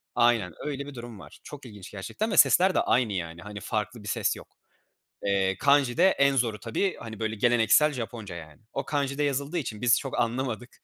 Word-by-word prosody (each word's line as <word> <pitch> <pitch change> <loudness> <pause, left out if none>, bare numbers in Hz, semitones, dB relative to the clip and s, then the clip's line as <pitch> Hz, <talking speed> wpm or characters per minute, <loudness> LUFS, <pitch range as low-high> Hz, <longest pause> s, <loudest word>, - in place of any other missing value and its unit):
Aynen 115 -7 +3
öyle 140 -2 -3
bir 145 - -10
durum 120 -3 -9
var. 75 -4 -14
Çok 145 -2 -10
ilginç 105 -5 -11
gerçekten 205 - -4
ve 190 - -1
sesler 185 +1 +6
de - - +4
aynı, 120 -4 +1
yani, 85 -2 -5
hani, 105 +2 -8
farklı 110 +2 -4
bir - - -9
ses - - 0
yok. - - -12 0.8
Eee, 95 -1 +1
kanji 140 -3 +3
de 185 +3 +6
en 140 -6 +3
zoru 115 -4 0
tabii, 120 - -1
hani, 110 -2 -8
böyle, 110 0 -2
geleneksel 120 +7 +4
Japonca, 115 -6 -6
yani. 80 0 -11
O 135 - -3
kanji'de 140 0 -1
yazıldığı 140 +4 -1
için 115 -9 -4
biz 120 -1 +4
çok 135 -3 -4
anlamadık 120 0 -2
120 Hz, 200 wpm, -27 LUFS, 105-140 Hz, 0.8 s, sesler